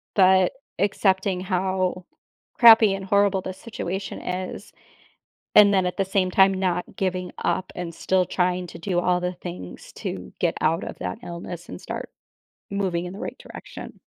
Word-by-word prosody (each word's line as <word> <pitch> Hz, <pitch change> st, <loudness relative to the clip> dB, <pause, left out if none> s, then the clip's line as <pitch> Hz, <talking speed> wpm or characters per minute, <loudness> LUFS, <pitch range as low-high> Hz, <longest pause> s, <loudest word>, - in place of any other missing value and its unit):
but 190 Hz, -2 st, +5 dB, 0.2 s
accepting 190 Hz, -1 st, +1 dB
how 185 Hz, -1 st, -1 dB, 0.5 s
crappy 225 Hz, -3 st, +8 dB
and 195 Hz, 0 st, -4 dB
horrible 200 Hz, -1 st, +3 dB
this 185 Hz, 0 st, -6 dB
situation 195 Hz, -4 st, -5 dB
is, 180 Hz, 0 st, -5 dB, 0.8 s
and 205 Hz, -1 st, +8 dB
then 190 Hz, -1 st, +3 dB
at 180 Hz, +2 st, -3 dB
the 195 Hz, -, +2 dB
same 190 Hz, -1 st, +1 dB
time, 190 Hz, +1 st, +5 dB
not 180 Hz, -2 st, -2 dB
giving 185 Hz, -1 st, -2 dB
up, 185 Hz, -, -1 dB
and 170 Hz, -2 st, -5 dB
still 185 Hz, -1 st, +1 dB
trying 180 Hz, 0 st, 0 dB
to 170 Hz, -, -10 dB
do 175 Hz, 0 st, -1 dB
all 180 Hz, 0 st, +2 dB
the 180 Hz, 0 st, -2 dB
things 175 Hz, -, -9 dB
to 60 Hz, -, -6 dB
get -, -, +1 dB
out -, -, +1 dB
of -, -, -7 dB
that 90 Hz, 0 st, -4 dB
illness 170 Hz, 0 st, -7 dB
and 90 Hz, -, -8 dB
start -, -, -6 dB, 0.6 s
moving 185 Hz, -3 st, -1 dB
in 180 Hz, -, -6 dB
the 200 Hz, -, -9 dB
right -, -, -5 dB
direction. -, -, -10 dB
185 Hz, 165 wpm, -24 LUFS, 180-195 Hz, 0.8 s, crappy